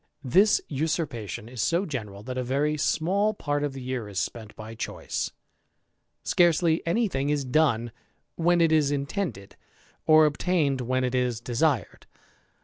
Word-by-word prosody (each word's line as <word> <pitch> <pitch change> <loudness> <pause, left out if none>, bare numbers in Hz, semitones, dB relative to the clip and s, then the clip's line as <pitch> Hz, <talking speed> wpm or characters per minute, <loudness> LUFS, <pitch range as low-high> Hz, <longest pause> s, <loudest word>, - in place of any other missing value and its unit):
This 190 - +4
usurpation 140 - -3
is 125 0 -5
so 175 +4 +1
general, 105 - -6
that 130 +2 -5
a 130 - -1
very 140 +4 0
small 195 +8 +1
part 145 -5 -2
of 145 -2 -2
lie 135 - -6
year 125 -4 -4
is 100 - -8
spent 110 +1 -4
by 110 +1 -9
choice; 115 - -4 0.9
scarcely 170 -1 +3
any 225 +7 +2
thing 140 -5 -2
is 145 -2 0
done 125 -4 +2 0.4
rhen 175 +1 +3
it 165 - +3
is 155 -3 +3
intended, 140 - -3 0.5
or 155 0 +7
obtained 150 -3 +1
when 130 +1 0
it 125 0 -1
is 125 -3 0
desired. 120 - -1
140 Hz, 150 wpm, -26 LUFS, 125-160 Hz, 0.9 s, or